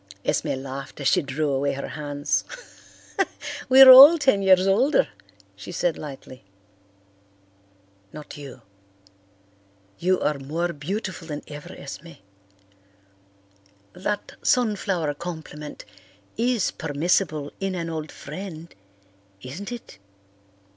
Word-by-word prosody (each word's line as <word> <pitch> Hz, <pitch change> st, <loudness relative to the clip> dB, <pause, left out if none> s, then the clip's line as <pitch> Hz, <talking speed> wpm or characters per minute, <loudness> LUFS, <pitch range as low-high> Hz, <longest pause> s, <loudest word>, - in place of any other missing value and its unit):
Esme -, -, 0 dB
laughed 135 Hz, +1 st, -8 dB
as 140 Hz, -, -1 dB
she 180 Hz, -, +3 dB
drew 145 Hz, +1 st, -2 dB
away 140 Hz, +1 st, 0 dB
her 140 Hz, -, -6 dB
hands. 145 Hz, -1 st, -2 dB, 1.3 s
"We 265 Hz, +1 st, +9 dB
are 260 Hz, -, +11 dB
all 280 Hz, +6 st, +11 dB
ten 265 Hz, -10 st, +2 dB
years 190 Hz, -1 st, +5 dB
older," 230 Hz, -, +3 dB, 0.5 s
she 100 Hz, -, -9 dB
said 175 Hz, -1 st, 0 dB
lightly. 135 Hz, -4 st, -10 dB, 1.7 s
"Not 150 Hz, -1 st, -10 dB
you. 140 Hz, -3 st, -11 dB, 1.4 s
You 185 Hz, +1 st, +2 dB
are 150 Hz, -2 st, -1 dB
more 165 Hz, +6 st, -3 dB
beautiful 175 Hz, +3 st, -5 dB
than 150 Hz, -2 st, -6 dB
ever, 145 Hz, 0 st, -9 dB
Esme. 160 Hz, +4 st, -9 dB, 1.8 s
That 200 Hz, +3 st, -4 dB
sunflower 195 Hz, -10 st, 0 dB
compliment 155 Hz, -2 st, -8 dB, 0.5 s
is 235 Hz, -3 st, 0 dB
permissible 155 Hz, -1 st, -1 dB
in 195 Hz, -1 st, -2 dB
an 170 Hz, -2 st, -3 dB
old 160 Hz, -2 st, -5 dB
friend, 165 Hz, +1 st, -9 dB, 0.7 s
isn't 170 Hz, -, -7 dB
it?" 235 Hz, -, -9 dB
165 Hz, 105 wpm, -24 LUFS, 145-195 Hz, 1.8 s, are